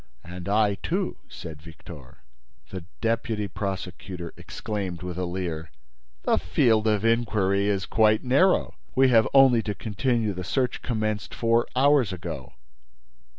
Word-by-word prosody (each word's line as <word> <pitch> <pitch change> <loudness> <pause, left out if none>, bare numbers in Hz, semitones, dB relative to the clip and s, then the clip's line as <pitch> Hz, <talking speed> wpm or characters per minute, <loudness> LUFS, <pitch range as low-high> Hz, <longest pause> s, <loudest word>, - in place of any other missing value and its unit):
"And 90 +2 -7
I, 105 -2 +2
too," - - -2
said 80 -3 -9
Victor. 80 -4 -13 0.5
The 95 -3 -6 0.2
deputy 115 -2 -1
prosecutor 90 -3 -5
exclaimed, 95 -5 -5
with 90 -1 -5
a 90 0 -2
leer: 85 -3 -4 0.5
"The - - +2
field 110 - +2
of 105 0 +1
inquiry 105 -4 +2
is 100 -2 0
quite 110 0 +3
narrow. 140 +9 +3 0.2
We 135 0 +5
have 115 -3 +5
only 135 -4 +6
to 105 -2 -4
continue 110 0 -1
the 90 0 -5
search 125 +7 -1
commenced 110 -3 -2
four 115 0 +2
hours 135 -4 +4
ago." 85 -7 -7
105 Hz, 135 wpm, -25 LUFS, 90-115 Hz, 0.5 s, only